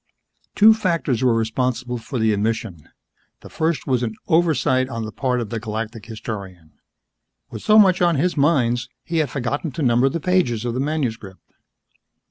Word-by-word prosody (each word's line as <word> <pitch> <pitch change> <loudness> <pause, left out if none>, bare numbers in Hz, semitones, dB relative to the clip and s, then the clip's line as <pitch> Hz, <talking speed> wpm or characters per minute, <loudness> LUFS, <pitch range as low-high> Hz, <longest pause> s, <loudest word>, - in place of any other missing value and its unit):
Two 220 +1 +7
factors 165 - -1
were 125 -3 +3
responsible 125 +2 -1
for 130 +3 -6
the 110 -2 +2
omission. 100 -6 -3 0.5
The - - -13
first 160 -4 -1
was 130 -3 0
an 110 -3 -3
oversight 135 -6 +2
on 115 -3 -4
the 110 - -6
part 125 +1 -1
of 115 -3 -5
the 115 - -2
Galactic 110 0 -5
Historian. 100 -7 -8 0.8
With - - -7
so 215 - +4
much 190 -4 +5
on 170 -2 +3
his 175 +6 0
minds, 125 -6 +1
he 165 - -3
had 155 -3 +1
forgotten 140 +4 -3
to 155 - -3
number 125 +1 +3
the 165 - -3
pages 150 -10 0
of 120 - -2
the 125 - -3
manuscript. 125 -10 -4
125 Hz, 170 wpm, -21 LUFS, 115-155 Hz, 0.8 s, Two